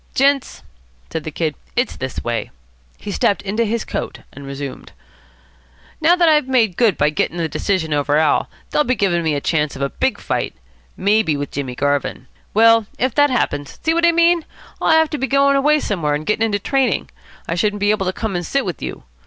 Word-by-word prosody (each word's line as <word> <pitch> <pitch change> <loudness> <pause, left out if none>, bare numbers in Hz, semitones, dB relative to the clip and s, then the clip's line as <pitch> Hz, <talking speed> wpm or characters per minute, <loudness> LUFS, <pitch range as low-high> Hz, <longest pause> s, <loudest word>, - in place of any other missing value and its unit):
"Gents," 275 0 +1 0.5
said 160 - -4
the - - -3
Kid, 155 0 -2 0.2
"it's 245 +1 0
this 130 -1 -5
way." 120 -1 -2 0.5
He 205 - -7
stepped 200 +1 +1
into 215 +4 0
his 225 +1 -2
coat, - - -5
and 140 0 -10
resumed. 140 0 -7 1.1
"Now 335 +3 +5
that 350 -2 +3
I've 300 -4 +4
made 230 -8 +2
good 225 -3 +3
by 150 +1 +2
getting 160 +3 -1
the 165 -1 0
decision 160 +1 -1
over 145 0 +1
Al., 155 -1 +2 0.2
they'll 300 - +3
be 255 -2 0
giving 185 -6 +1
me 160 -2 0
a - - 0
chance 150 0 0
of 135 - -7
a 140 - -1
big 260 -6 -1
fight. - - -2 0.4
Maybe 200 -6 +2
with 145 -1 -4
Jimmy 135 -3 -4
Garvin. 145 -1 -1 0.3
Well, 225 0 +5
if 255 -1 0
that 290 0 +4
happens, 145 - -1
see 320 - +2
what 335 +1 +3
I - - +5
mean? 335 0 +3 0.4
I'll - - +1
have 320 -1 +4
to 300 - -3
be 270 - -1
going 275 +1 +3
away 300 +2 +3
somewhere 165 - -1
and 150 +1 -5
getting 225 +1 +1
into 205 -2 0
training. 255 +1 0 0.4
I - - -1
shouldn't 205 +4 0
be 205 +1 +3
able 195 -3 0
to - - +1
come 210 0 -4
and 175 - -1
sit 275 +9 -1
with 175 -8 -5
you. 65 - -6
205 Hz, 210 wpm, -19 LUFS, -, 1.1 s, Now